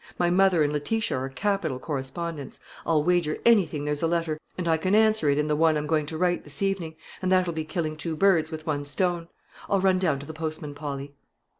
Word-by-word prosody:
"My 175 Hz, 0 st, +2 dB
mother 185 Hz, -3 st, +4 dB
and 145 Hz, 0 st, 0 dB
Letitia 210 Hz, +9 st, -1 dB
are 130 Hz, +1 st, -3 dB
capital 175 Hz, -3 st, -1 dB
correspondents; 145 Hz, +2 st, -5 dB, 0.3 s
I'll 155 Hz, -2 st, +3 dB
wager 175 Hz, -2 st, +1 dB
anything 170 Hz, -11 st, +3 dB
there's 150 Hz, 0 st, -2 dB
a 165 Hz, -, +2 dB
letter, 165 Hz, -2 st, -1 dB, 0.2 s
and 180 Hz, -2 st, -2 dB
I 165 Hz, -, +4 dB
can 185 Hz, +5 st, +1 dB
answer 215 Hz, -7 st, +4 dB
it 140 Hz, -, +2 dB
in 150 Hz, -, +1 dB
the 150 Hz, -, +1 dB
one 160 Hz, 0 st, +3 dB
I'm 150 Hz, -, -2 dB
going 155 Hz, -1 st, 0 dB
to 160 Hz, -, -4 dB
write 175 Hz, +1 st, +1 dB
this 145 Hz, +5 st, -2 dB
evening, 185 Hz, -5 st, -1 dB, 0.3 s
and 185 Hz, 0 st, 0 dB
that'll 185 Hz, -2 st, +3 dB
be 160 Hz, -1 st, -3 dB
killing 155 Hz, -1 st, -3 dB
two 160 Hz, +1 st, -3 dB
birds 170 Hz, -3 st, +3 dB
with 155 Hz, -1 st, -7 dB
one 145 Hz, -2 st, -1 dB
stone. 170 Hz, +3 st, -1 dB, 0.4 s
I'll 200 Hz, -, +3 dB
run 190 Hz, -1 st, +3 dB
down 160 Hz, -7 st, +1 dB
to 140 Hz, -, -9 dB
the 160 Hz, -, -8 dB
postman, 155 Hz, -2 st, -5 dB
Polly." 145 Hz, -1 st, -6 dB
160 Hz, 225 wpm, -26 LUFS, 150-180 Hz, 0.4 s, mother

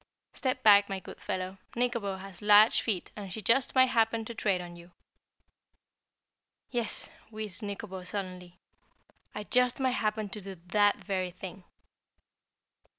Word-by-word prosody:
"Step 255 Hz, -1 st, -2 dB
back, 205 Hz, -1 st, +7 dB
my 195 Hz, -1 st, -3 dB
good -, -, -12 dB
fellow, 185 Hz, +1 st, -4 dB, 0.2 s
Nikobo 235 Hz, -5 st, 0 dB
has 190 Hz, -1 st, -10 dB
large 210 Hz, +2 st, +6 dB
feet 200 Hz, -6 st, -2 dB
and 200 Hz, -3 st, -7 dB
she 220 Hz, -, -5 dB
just 230 Hz, +7 st, +2 dB
might 260 Hz, 0 st, +6 dB
happen 225 Hz, -1 st, +2 dB
to 235 Hz, -, -6 dB
tread 200 Hz, -4 st, 0 dB
on 175 Hz, -1 st, -8 dB
you." 170 Hz, 0 st, -14 dB, 1.8 s
"Yes," 240 Hz, -3 st, -2 dB, 0.2 s
wheezed 215 Hz, -4 st, -5 dB
Nikobo 200 Hz, -2 st, -6 dB
sullenly, 180 Hz, -2 st, -6 dB, 0.8 s
"I 210 Hz, -, -4 dB
just 250 Hz, +3 st, +2 dB
might 260 Hz, -1 st, +2 dB
happen 215 Hz, -3 st, -1 dB
to 210 Hz, +2 st, -6 dB
do 195 Hz, 0 st, -8 dB
that 205 Hz, +4 st, +2 dB
very 185 Hz, -2 st, -1 dB
thing." 185 Hz, +1 st, -9 dB
205 Hz, 145 wpm, -30 LUFS, 185-225 Hz, 1.8 s, back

